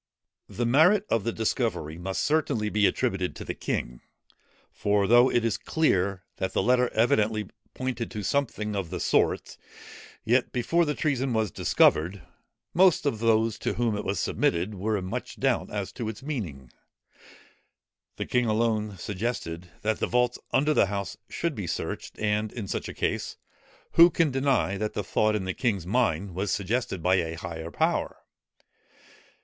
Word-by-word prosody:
The 120 Hz, -, -2 dB
merit 170 Hz, -, +5 dB
of 115 Hz, -2 st, +1 dB
the 115 Hz, -, +1 dB
discovery 110 Hz, -, -2 dB
must 95 Hz, +2 st, -2 dB
certainly 140 Hz, -9 st, +1 dB
be 105 Hz, -1 st, +3 dB
attributed 95 Hz, -1 st, -1 dB
to -, -, -8 dB
the -, -, -3 dB
king. -, -, -4 dB, 0.7 s
For 100 Hz, -1 st, +1 dB
though 120 Hz, +4 st, +6 dB
it 120 Hz, -1 st, +1 dB
is 115 Hz, -, 0 dB
clear 100 Hz, -, +1 dB
that 95 Hz, -, -2 dB
the -, -, +1 dB
letter 125 Hz, 0 st, +3 dB
evidently 110 Hz, -2 st, +2 dB, 0.2 s
pointed 125 Hz, -3 st, -3 dB
to 105 Hz, -2 st, -5 dB
something 105 Hz, -4 st, -1 dB
of 95 Hz, -4 st, -3 dB
the 90 Hz, 0 st, -4 dB
sort; -, -, +1 dB, 0.7 s
yet 120 Hz, +3 st, +2 dB
before 165 Hz, +8 st, +1 dB
the 150 Hz, -1 st, -1 dB
treason 135 Hz, -4 st, 0 dB
was 110 Hz, -4 st, 0 dB
discovered, 90 Hz, +5 st, +2 dB, 0.5 s
most 180 Hz, -3 st, +4 dB
of 135 Hz, -7 st, 0 dB
those 115 Hz, -1 st, +2 dB
to -, -, -1 dB
whom 115 Hz, -3 st, 0 dB
it 105 Hz, -, -3 dB
was 100 Hz, -1 st, -2 dB
submitted, 90 Hz, +5 st, 0 dB
were 105 Hz, +2 st, -1 dB
in 95 Hz, -, -4 dB
much 95 Hz, -, -5 dB
doubt -, -, +1 dB
as -, -, -4 dB
to 110 Hz, -, -4 dB
its 110 Hz, +3 st, -8 dB
meaning. 85 Hz, -, -5 dB, 1.4 s
The -, -, -4 dB
king 125 Hz, -1 st, +1 dB
alone 110 Hz, -2 st, 0 dB
suggested, 90 Hz, -4 st, -4 dB
that 110 Hz, 0 st, 0 dB
the -, -, 0 dB
vaults 125 Hz, 0 st, +1 dB
under 145 Hz, +4 st, +3 dB
the 100 Hz, -, +4 dB
House 100 Hz, 0 st, -4 dB
should 170 Hz, -1 st, -2 dB
be 105 Hz, -8 st, -5 dB
searched: -, -, -4 dB
and 105 Hz, 0 st, 0 dB
in 110 Hz, -5 st, -6 dB
such -, -, -3 dB
a -, -, -6 dB
case, -, -, -2 dB, 0.5 s
who 170 Hz, +1 st, +8 dB
can 165 Hz, -3 st, +1 dB
deny, 130 Hz, -7 st, +1 dB
that 105 Hz, +1 st, -2 dB
the 105 Hz, -, -2 dB
thought 110 Hz, +3 st, +1 dB
in 100 Hz, -3 st, -2 dB
the 95 Hz, -, -2 dB
king's 100 Hz, -8 st, -1 dB
mind 100 Hz, -4 st, 0 dB
was 95 Hz, +3 st, -2 dB
suggested 100 Hz, -2 st, -1 dB
by 95 Hz, +1 st, +4 dB
a 80 Hz, -2 st, -1 dB
higher 80 Hz, -1 st, -6 dB
power? -, -, 0 dB
110 Hz, 170 wpm, -27 LUFS, 95-125 Hz, 1.4 s, who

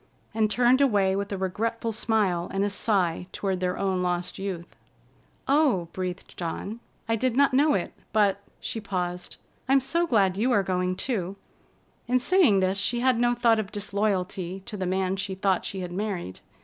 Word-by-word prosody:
and 215 Hz, -1 st, +2 dB
turned 245 Hz, +4 st, +4 dB
away 200 Hz, -8 st, +3 dB
with 200 Hz, +1 st, -3 dB
a 200 Hz, -, -2 dB
regretful 225 Hz, +5 st, -2 dB
smile 205 Hz, -6 st, 0 dB
and 195 Hz, +1 st, 0 dB
a 205 Hz, -, -1 dB
sigh 185 Hz, -4 st, 0 dB
toward 190 Hz, -2 st, -2 dB
their 180 Hz, 0 st, -1 dB
own 190 Hz, -2 st, 0 dB
lost 180 Hz, +1 st, -2 dB
youth. 185 Hz, -3 st, -5 dB, 0.7 s
"Oh!" 270 Hz, -, +3 dB
breathed 185 Hz, 0 st, -5 dB
Dawn. 190 Hz, +6 st, -4 dB, 0.3 s
"I 225 Hz, -, +2 dB
did 250 Hz, +2 st, 0 dB
not 280 Hz, -1 st, +4 dB
know 290 Hz, +3 st, +4 dB
it, 185 Hz, -, -2 dB, 0.2 s
but"—she 205 Hz, +1 st, -1 dB
paused—"I'm 180 Hz, +7 st, -2 dB
so 335 Hz, +6 st, 0 dB
glad 195 Hz, -, +2 dB
you 240 Hz, +5 st, +2 dB
are 200 Hz, -, +3 dB
going, 180 Hz, -1 st, 0 dB
too!" 195 Hz, -5 st, -2 dB, 0.7 s
In 250 Hz, +1 st, +3 dB
saying 255 Hz, -, +4 dB
this, 190 Hz, +1 st, +1 dB
she 240 Hz, +5 st, +1 dB
had 255 Hz, -2 st, +3 dB
no 240 Hz, 0 st, +3 dB
thought 235 Hz, -2 st, +3 dB
of 210 Hz, -2 st, -4 dB
disloyalty 195 Hz, -3 st, -2 dB
to 235 Hz, -, -6 dB
the 190 Hz, -2 st, -2 dB
man 190 Hz, +1 st, 0 dB
she 195 Hz, 0 st, -3 dB
thought 190 Hz, -1 st, +1 dB
she 190 Hz, -, -4 dB
had 180 Hz, -1 st, -5 dB
married. 185 Hz, -, -4 dB
200 Hz, 175 wpm, -26 LUFS, 185-230 Hz, 0.7 s, turned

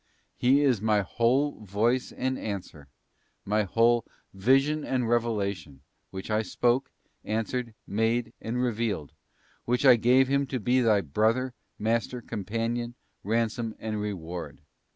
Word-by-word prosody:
He 135 Hz, +4 st, +4 dB
is 125 Hz, -8 st, +2 dB
My 105 Hz, -1 st, +3 dB
whole 125 Hz, +9 st, +1 dB
Voice 110 Hz, +6 st, 0 dB
and 130 Hz, 0 st, -2 dB
Answer, 90 Hz, -8 st, -6 dB, 0.6 s
My 105 Hz, +2 st, +2 dB
whole 115 Hz, +4 st, +3 dB, 0.3 s
Vision 135 Hz, +9 st, +2 dB
and 125 Hz, -3 st, -1 dB
Revelation, 100 Hz, -, -1 dB, 0.3 s
which 95 Hz, +3 st, -7 dB
I 110 Hz, +1 st, +2 dB
spoke, 120 Hz, +5 st, +1 dB, 0.3 s
answered, 115 Hz, +2 st, -2 dB
made, 115 Hz, +2 st, 0 dB
and 115 Hz, +2 st, -3 dB
revealed, 110 Hz, -, -2 dB, 0.5 s
when 125 Hz, +1 st, +2 dB
I 125 Hz, -3 st, +8 dB
gave 125 Hz, +3 st, +4 dB
Him 140 Hz, +1 st, +1 dB
to 130 Hz, -1 st, -3 dB
be 125 Hz, +4 st, +2 dB
thy 110 Hz, -4 st, +4 dB
Brother, 110 Hz, -, +1 dB, 0.2 s
Master, 115 Hz, +3 st, -1 dB
Companion, 115 Hz, +2 st, -3 dB, 0.3 s
Ransom 115 Hz, +1 st, -1 dB
and 110 Hz, -1 st, -3 dB
Reward. 90 Hz, -6 st, -5 dB
115 Hz, 130 wpm, -27 LUFS, 105-125 Hz, 0.6 s, I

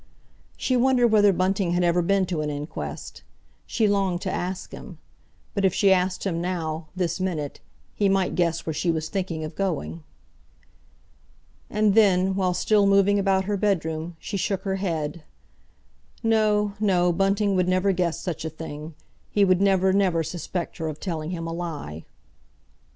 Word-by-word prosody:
She 255 Hz, -, 0 dB
wondered 250 Hz, -1 st, +4 dB
whether 205 Hz, -2 st, +5 dB
Bunting 185 Hz, -1 st, 0 dB
had 175 Hz, 0 st, +1 dB
ever 175 Hz, 0 st, +3 dB
been 195 Hz, +2 st, +2 dB
to 175 Hz, -4 st, -2 dB
an 150 Hz, -, -2 dB
inquest. 145 Hz, +1 st, -6 dB, 0.5 s
She 220 Hz, -3 st, +1 dB
longed 195 Hz, -3 st, +1 dB
to 190 Hz, -, -2 dB
ask 185 Hz, +1 st, -4 dB
him. -, -, -10 dB, 0.6 s
But 200 Hz, -, -1 dB
if 190 Hz, -2 st, +3 dB
she 195 Hz, -2 st, +5 dB
asked 180 Hz, 0 st, 0 dB
him 170 Hz, -4 st, -1 dB
now, 165 Hz, -3 st, -3 dB
this 180 Hz, -1 st, -1 dB
minute, 165 Hz, -6 st, -3 dB, 0.3 s
he 200 Hz, -1 st, +1 dB
might 195 Hz, -1 st, +1 dB
guess 170 Hz, -2 st, 0 dB
where 160 Hz, -, -2 dB
she 155 Hz, +4 st, -1 dB
was 160 Hz, -1 st, -1 dB
thinking 180 Hz, -4 st, -3 dB
of 155 Hz, -, -6 dB
going. 85 Hz, -, -3 dB, 1.7 s
And 210 Hz, -1 st, +2 dB
then, 190 Hz, -3 st, +4 dB
while 185 Hz, -2 st, 0 dB
still 205 Hz, 0 st, +3 dB
moving 200 Hz, +1 st, +4 dB
about 190 Hz, -1 st, +2 dB
her 205 Hz, 0 st, -1 dB
bedroom, 170 Hz, -4 st, -1 dB
she 200 Hz, -, -4 dB
shook 190 Hz, 0 st, -1 dB
her 195 Hz, -1 st, -1 dB
head—no, 205 Hz, +5 st, -3 dB
no, 180 Hz, -4 st, +2 dB
Bunting 195 Hz, +2 st, +1 dB
would 180 Hz, -1 st, +2 dB
never 185 Hz, +2 st, +2 dB
guess 175 Hz, -3 st, -1 dB
such 175 Hz, -5 st, -4 dB
a 160 Hz, -, -2 dB
thing; 155 Hz, 0 st, -8 dB, 0.3 s
he 205 Hz, -1 st, +3 dB
would 185 Hz, -1 st, +3 dB
never, 190 Hz, -1 st, +3 dB
never 185 Hz, -4 st, +2 dB
suspect 175 Hz, +1 st, -5 dB
her 160 Hz, -, -3 dB
of 155 Hz, -1 st, -5 dB
telling 160 Hz, -4 st, -4 dB
him 170 Hz, -2 st, -4 dB
a 165 Hz, -, -4 dB
lie. 150 Hz, -, -6 dB
185 Hz, 165 wpm, -25 LUFS, 165-195 Hz, 1.7 s, whether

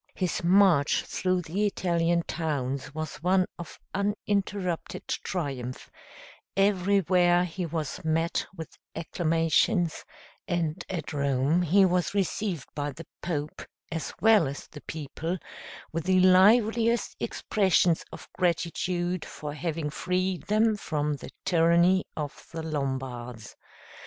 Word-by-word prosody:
His 180 Hz, -2 st, -1 dB
march 175 Hz, -5 st, +4 dB
through 185 Hz, -1 st, -1 dB
the 195 Hz, +6 st, 0 dB
Italian 170 Hz, -3 st, +1 dB
towns 140 Hz, -6 st, -3 dB
was 155 Hz, 0 st, -4 dB
one 185 Hz, +3 st, +2 dB
of 170 Hz, -, -9 dB
uninterrupted 200 Hz, -3 st, -2 dB
triumph; 135 Hz, -8 st, -4 dB, 0.7 s
everywhere 185 Hz, -3 st, +3 dB
he 180 Hz, 0 st, -4 dB
was 160 Hz, -2 st, -4 dB
met 165 Hz, +1 st, 0 dB
with 160 Hz, -, -9 dB, 0.2 s
acclamations, 165 Hz, +2 st, +1 dB, 0.4 s
and 175 Hz, -1 st, -1 dB
at 175 Hz, -4 st, -4 dB
Rome 140 Hz, +3 st, +2 dB
he 190 Hz, +3 st, +5 dB
was 180 Hz, +1 st, +1 dB
received 195 Hz, -4 st, -1 dB
by 145 Hz, 0 st, -2 dB
the 165 Hz, +4 st, -10 dB, 0.2 s
Pope, 150 Hz, -3 st, -3 dB, 0.3 s
as 165 Hz, -1 st, -3 dB
well 220 Hz, -7 st, +5 dB
as 140 Hz, +2 st, -6 dB
the 150 Hz, -, -12 dB
people, 160 Hz, +3 st, -4 dB, 0.5 s
with 165 Hz, 0 st, -3 dB
the 185 Hz, 0 st, +4 dB
liveliest 220 Hz, +5 st, +4 dB
expressions 185 Hz, -4 st, +2 dB
of -, -, -10 dB
gratitude 175 Hz, 0 st, -1 dB
for 150 Hz, -1 st, -7 dB
having 155 Hz, -1 st, -3 dB
freed 180 Hz, +2 st, -1 dB
them 215 Hz, +1 st, +3 dB
from 150 Hz, -5 st, -1 dB
the -, -, -9 dB, 0.2 s
tyranny 170 Hz, +2 st, +4 dB
of 150 Hz, -2 st, -6 dB
the 165 Hz, -1 st, -5 dB
Lombards. 130 Hz, -6 st, -4 dB
170 Hz, 115 wpm, -27 LUFS, 155-185 Hz, 0.7 s, he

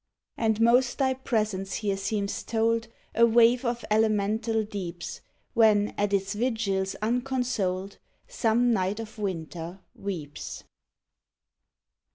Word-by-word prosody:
And 220 Hz, -1 st, +1 dB
most 240 Hz, +2 st, +4 dB
thy 265 Hz, -2 st, +2 dB
presence 215 Hz, -7 st, -1 dB
here 205 Hz, -2 st, -1 dB
seems 200 Hz, +1 st, -2 dB
told, 230 Hz, 0 st, 0 dB, 0.3 s
A 230 Hz, -, +3 dB
waif 235 Hz, +2 st, +5 dB
of 240 Hz, -1 st, -2 dB
elemental 220 Hz, +1 st, +2 dB
deeps. 185 Hz, -5 st, -6 dB, 0.3 s
When, 215 Hz, -3 st, +4 dB
at 205 Hz, 0 st, 0 dB
its 195 Hz, 0 st, 0 dB
vigils 210 Hz, -4 st, -1 dB
unconsoled, 235 Hz, -6 st, -1 dB, 0.3 s
Some 240 Hz, -, +2 dB
night 195 Hz, +1 st, 0 dB
of 220 Hz, -1 st, -8 dB
winter 175 Hz, -1 st, -4 dB
weeps. 160 Hz, -7 st, -6 dB
215 Hz, 110 wpm, -27 LUFS, 195-235 Hz, 0.3 s, waif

